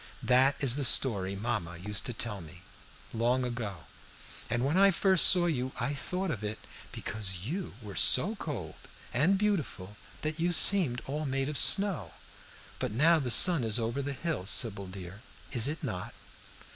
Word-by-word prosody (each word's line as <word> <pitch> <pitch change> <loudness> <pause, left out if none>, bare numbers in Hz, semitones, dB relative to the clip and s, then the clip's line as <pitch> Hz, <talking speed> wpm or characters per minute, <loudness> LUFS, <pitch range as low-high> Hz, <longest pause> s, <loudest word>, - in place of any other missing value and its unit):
"That 130 +2 +3
is 130 -1 +2
the 145 - -2
story 100 -7 +3
mamma 90 -5 -4
used 100 +2 -3
to - - -4
tell 110 -3 -4
me, 85 +3 -14 0.5
long 120 +3 0
ago, 110 -9 -6 0.7
and 120 +2 -1
when 145 +4 -1
I 195 +1 +5
first 190 -1 +3
saw 180 -2 +4
you 130 -6 -3
I 130 +5 -2
thought 180 +6 -4
of 110 -7 -6
it, 105 +1 -5 0.3
because 95 -3 -4
you 175 - -6
were 100 -2 -9
so - - +5
cold - - -7 0.4
and 160 +11 +2
beautiful 130 - -3 0.3
that 155 +1 -4
you 175 +1 +1
seemed 165 -10 +5
all 150 +2 -4
made 135 +1 -2
of 150 - -6
snow. 200 -3 +2 0.6
But - - -3
now 160 +9 +3
the 130 -4 -4
sun 165 +3 +6
is 110 -1 -1
over 115 +4 -3
the 140 +1 -5
hill, 140 - -5
Sybil 100 -3 +1
dear, 95 +2 -10 0.3
is 120 0 0
it 155 +3 -5
not?" 95 -9 -6
125 Hz, 170 wpm, -29 LUFS, 105-155 Hz, 0.7 s, sun